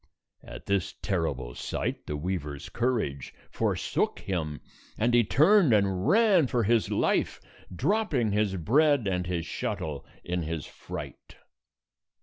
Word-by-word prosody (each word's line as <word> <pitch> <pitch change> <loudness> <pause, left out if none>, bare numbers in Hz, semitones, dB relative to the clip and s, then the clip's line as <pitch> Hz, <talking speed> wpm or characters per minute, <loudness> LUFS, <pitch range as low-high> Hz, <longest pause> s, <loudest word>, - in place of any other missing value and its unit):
At - - -10
this 100 -3 -1
terrible 75 -11 -2
sight, - - -4
the 75 - -3
weaver's 75 -3 -4
courage 110 - -2 0.2
forsook - - -1
him, 80 -6 -3 0.4
and 120 +2 +1
he 120 0 +6
turned 155 - +5
and 100 -3 +1
ran 200 - +5
for 120 -1 0
his 115 +1 +2
life, - - +1 0.3
dropping 140 - 0
his 105 -1 +1
bread 140 - +3
and 90 -1 -1
his 85 -2 -2
shuttle 75 -3 -4 0.2
in 90 0 -2
his 80 -2 -4
fright. - - -9
100 Hz, 130 wpm, -28 LUFS, 80-120 Hz, 0.4 s, he